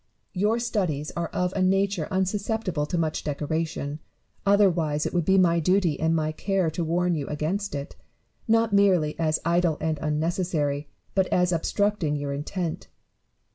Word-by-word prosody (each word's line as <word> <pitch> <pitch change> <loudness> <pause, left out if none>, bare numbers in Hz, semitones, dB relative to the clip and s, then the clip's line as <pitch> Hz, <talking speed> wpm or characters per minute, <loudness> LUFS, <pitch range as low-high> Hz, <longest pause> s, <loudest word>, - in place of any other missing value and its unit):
Your 210 +4 +1
studies 185 -11 -1
are 170 -1 -1
of 180 +2 -1
a 195 - 0
nature 195 -2 +1
unsusceptible 190 -3 -1
of 175 - 0
much 160 -2 -1
decoration: 150 0 -3 0.5
otherwise 170 -7 +3
it - - -2
would 175 -3 +1
be 190 0 +4
my 170 -2 +4
duty 180 -2 +2
and 160 +1 +2
my 155 -1 0
care 190 0 0
to 170 +2 -2
warn 175 +2 +1
you 145 -4 -2
against 165 +6 -2
it, 140 0 -6 0.5
not 225 -1 +3
merely 185 -7 +4
as 155 -1 +1
idle 170 -2 +2
and 160 -2 -1
unnecessary, 150 -2 -1 0.3
but 190 -1 +2
as 180 0 +2
obstructing 180 -1 0
your 145 -1 -3
intent. 160 +4 -4
170 Hz, 155 wpm, -26 LUFS, 155-190 Hz, 0.5 s, be